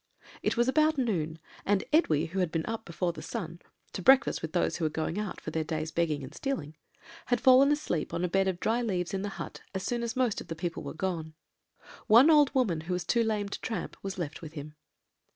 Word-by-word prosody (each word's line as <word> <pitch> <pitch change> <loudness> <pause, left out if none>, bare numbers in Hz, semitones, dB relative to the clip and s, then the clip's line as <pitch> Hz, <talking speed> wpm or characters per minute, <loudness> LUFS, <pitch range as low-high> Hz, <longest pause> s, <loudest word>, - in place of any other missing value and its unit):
It - - 0
was 240 +1 +3
about 310 +3 +3
noon, 170 - -1 0.3
and 200 -1 +2
Edwy, 160 - +3
who 180 +4 -4
had 180 -3 +1
been 165 -2 -1
up 225 0 -4
before 170 +1 -2
the 155 - -8
sun, 170 -7 -6 0.3
to - - -4
breakfast 265 +4 +5
with 160 - -4
those 175 - 0
who 170 - -4
were 155 - +2
going 160 +4 -2
out 210 -3 -4
for 155 - -6
their 160 0 -1
day's 155 0 -3
begging 155 -4 0
and 130 +3 -9
stealing, 160 - -4 0.5
had 245 -2 +2
fallen 260 +3 +6
asleep 295 - -1
on 170 +1 -2
a - - +2
bed 195 +2 +2
of 185 -2 -1
dry 230 +5 +1
leaves 185 -5 -2
in 190 - -1
the 205 - -3
hut, - - -7
as 190 - -2
soon 240 -1 -1
as 235 -1 -3
most 250 -4 +1
of - - -11
the 165 - -4
people 170 0 -4
were - - -7
gone; 160 -3 -3 0.7
one 240 +9 +8
old 295 -3 +6
woman, 200 -12 +2
who 175 +3 -3
was 180 0 -1
too 235 - +2
lame 215 -2 -1
to - - -6
tramp, 225 - -4
was 195 -1 -5
left 165 -5 -4
with 160 -2 -9
him. 150 -1 -8
185 Hz, 240 wpm, -29 LUFS, 160-235 Hz, 0.7 s, one